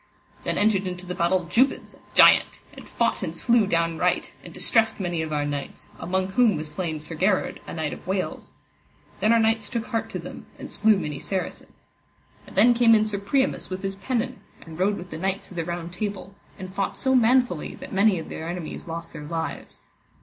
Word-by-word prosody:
Then - - -1
entered 205 -2 +3
into 180 0 -6
the 180 - -4
battle 180 0 +1
Jubance 245 +11 +1
a - - -19 0.2
giant, - - +6
and - - -12
fought - - 0
and - - -4
slew 235 -4 +3
down 165 -3 0
right, - - 0
and - - -10
distressed 225 -1 +2
many 175 -3 -1
of 160 -1 -4
our 145 -1 0
knights, 145 -1 -5
among 185 +1 -1
whom 220 +1 +4
was 155 0 -5
slain 160 0 -3
Sir 150 +2 -7
Gherard, 185 +4 +1
a - - -6
knight 155 -2 -2
of - - -11
Wales. 190 0 -3 0.7
Then 215 - +3
our 230 - +6
knights 225 -1 +1
took 235 -3 -3
heart 225 -2 -2
to - - -4
them, - - -9
and - - -9
slew 220 -1 +4
many 150 -6 -4
Saracens. 190 +3 -6 0.5
And - - -13
then 230 +5 +6
came 235 -1 +6
in 215 0 +3
Sir 210 -2 -2
Priamus 265 +7 0
with 185 +1 -5
his 195 0 -1
pennon, 250 +5 -2 0.3
and 165 0 -10
rode 200 +2 +2
with 180 0 -9
the 155 - -6
knights 195 +2 -2
of - - -10
the 165 - -1
Round 175 0 -5
Table, 195 -1 -4 0.2
and 185 0 -8
fought 195 0 -2
so 265 -1 +1
manfully 245 -7 +3
that - - -10
many 200 0 +4
of 160 - -6
their 160 +1 -5
enemies 175 -1 -6
lost 165 0 -6
their 150 - -8
lives. 165 +1 -5
190 Hz, 210 wpm, -25 LUFS, 170-220 Hz, 0.7 s, giant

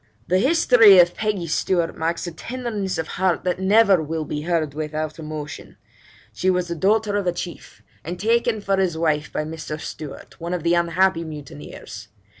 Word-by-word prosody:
'The 185 +1 +3
history 245 - +6
of 175 0 +6
Peggy 210 -5 -2
Stewart 170 +1 0
marks 165 +2 -2
a 175 - -5
tenderness 210 -1 -4
of 160 -1 -3
heart 185 -1 0
that 180 0 -1
never 195 -1 +4
will 160 0 -3
be 150 0 -4
heard 160 -3 -1
without 155 +1 -4
emotion: 155 -1 -7 0.6
she 185 - 0
was 180 -1 0
the 170 - -2
daughter 205 +4 +1
of 200 -3 -2
a - - +3
chief, 175 0 -8 0.2
and 175 +3 -6
taken 230 0 +1
for 195 -1 0
his 185 -4 0
wife 155 -2 0
by - - -2
Mr. 155 -1 -6
Stewart, 150 -2 -9
one 170 +2 -2
of 170 - -5
the 170 - +2
unhappy 170 +1 +2
mutineers. 145 -8 -9
175 Hz, 180 wpm, -22 LUFS, 155-195 Hz, 0.6 s, history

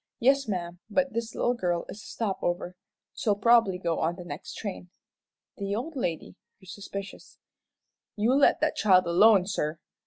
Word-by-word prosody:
"Yes, 275 +2 +3
ma'am, 175 -3 -4
but 270 +4 0
this 230 0 -4
little 245 - +1
girl 175 -7 -1
is 205 - -9
a - - -14
stop 210 -4 -3
over. 175 +1 -2 0.4
She'll 210 -2 0
probably 225 -2 +4
go 170 -3 -2
on 165 +2 0
the 180 -1 -10
next 150 -1 -8
train." 195 -4 -6 0.7
The 200 0 -2
old 285 +8 -5
lady 175 - -3 0.2
grew 190 - -20
suspicious. 200 +1 -8 0.8
"You 220 +4 +2
let 280 +1 +4
that 310 0 +1
child 185 -3 +4
alone, 190 +3 +5
sir. 160 -5 -2
200 Hz, 165 wpm, -27 LUFS, 175-230 Hz, 0.8 s, alone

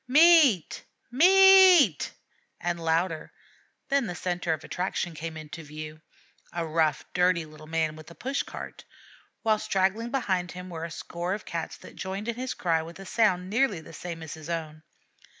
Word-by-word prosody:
"Meat! 295 - +5 0.3
Meat!" 370 - +6 0.5
and 175 -1 -3
louder; 165 0 0 0.6
then 275 -4 +2
the 180 - -5
centre 175 -1 -2
of 160 - -2
attraction 180 -1 -3
came 160 +1 -6
in 155 -1 -8
view 155 0 -9 0.5
a 170 -1 -3
rough, 155 -1 0
dirty 180 -2 +2
little 155 0 -14
man 160 -1 -1
with 155 +1 -12
a 170 - -13
push 270 +2 -2
cart; - - -9 0.6
while 215 -1 +2
straggling 210 +2 0
behind 190 -9 -1
him 180 0 -9
were 165 -1 -5
a - - -6
score 175 +3 -4
of 210 - -10
Cats 165 -1 -5
that - - -14
joined 195 +3 -5
in 235 - 0
his 255 +2 -4
cry 165 -2 +1
with 165 +1 -10
a 195 - -10
sound 185 -4 +1
nearly 220 -2 +1
the 160 +1 -13
same 165 0 -7
as 160 - -7
his 160 0 -10
own. 155 -2 -4
175 Hz, 170 wpm, -27 LUFS, 160-220 Hz, 0.6 s, Meat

